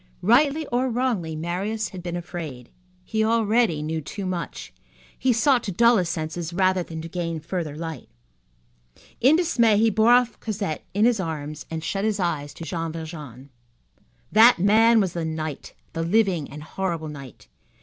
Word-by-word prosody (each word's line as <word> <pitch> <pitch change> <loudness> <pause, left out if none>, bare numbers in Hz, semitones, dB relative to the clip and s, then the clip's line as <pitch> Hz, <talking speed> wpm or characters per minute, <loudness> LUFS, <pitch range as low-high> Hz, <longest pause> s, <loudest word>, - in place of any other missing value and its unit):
Rightly 280 - +3
or 250 +2 +1
wrongly, 230 -10 -1
Marius 190 +7 -2
had 185 - -8
been 175 -1 -4
afraid. 165 -8 -7 0.3
He 220 +3 -1
already 220 -7 +2
knew 160 +1 -2
too 195 +6 -6
much. 175 -5 -5 0.4
He 255 - +1
sought 245 +2 +3
to 200 - -2
dull 235 +5 +5
his 180 -3 0
senses 165 0 -4
rather 185 0 +2
than 160 -2 -7
to - - -6
gain 165 -1 -3
further 160 -2 -4
light. 160 -1 -6 1.1
In 270 +6 +5
dismay 240 - +3
he 225 +1 +3
bore 220 +3 +3
off 245 -1 +3
Cosette 200 -7 -3
in 210 +2 +4
his 240 -3 +3
arms 155 -3 -5
and 160 -1 -5
shut 195 +3 -2
his 215 -1 0
eyes 150 -5 -1
to - - -8
Jean 165 -1 -3
Valjean. 150 -5 -9 0.8
That 225 +3 +7
man 220 +5 +5
was 190 -4 0
the 170 - -3
night, 155 -2 -5 0.2
the 165 - -2
living 180 -3 +1
and 150 +1 -9
horrible 170 -1 -3
night. 140 -5 -10
180 Hz, 170 wpm, -24 LUFS, 160-220 Hz, 1.1 s, That